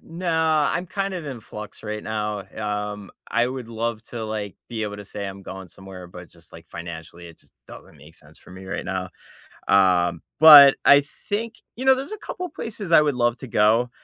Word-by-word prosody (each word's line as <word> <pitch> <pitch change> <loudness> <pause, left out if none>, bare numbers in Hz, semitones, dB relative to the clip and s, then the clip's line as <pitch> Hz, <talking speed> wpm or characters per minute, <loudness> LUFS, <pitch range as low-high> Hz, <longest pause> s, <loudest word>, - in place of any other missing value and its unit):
Nah, 160 -3 0
I'm 180 - -3
kind 195 0 -3
of 175 -4 -5
in 135 -4 -6
flux 105 -1 -10
right 105 0 -5
now, 105 -2 -3
um, 105 -1 -4 0.2
I 120 +1 +2
would 130 -2 -6
love 115 -1 -3
to, 115 -2 -6
like, 105 -2 -5
be 115 -2 -4
able 105 -1 -4
to 105 - -9
say 100 +1 -6
I'm 95 0 -7
going 95 -1 -9
somewhere, 95 0 -11
but 90 0 -12
just, 85 - -18
like, 80 0 -13
financially, 85 0 -9
it 85 - -16
just - - -19 0.2
doesn't - - -13
make 75 +3 -16
sense 75 0 -14
for - - -18
me 95 +1 -11
right 95 +2 -5
now. 95 -1 -4 0.6
Um, 90 -3 +3 0.2
but 145 -3 +11
I 140 0 +7 0.2
think 220 +2 -2 0.2
you 255 - -5
know, 265 0 +6
there's 270 +8 -6
a 430 - -6
couple 365 -2 -6
places 210 - -7
I 165 - +7
would 150 -2 +1
love 120 -1 +1
to - - -9
go. 115 +2 +2
105 Hz, 210 wpm, -23 LUFS, 95-145 Hz, 0.6 s, but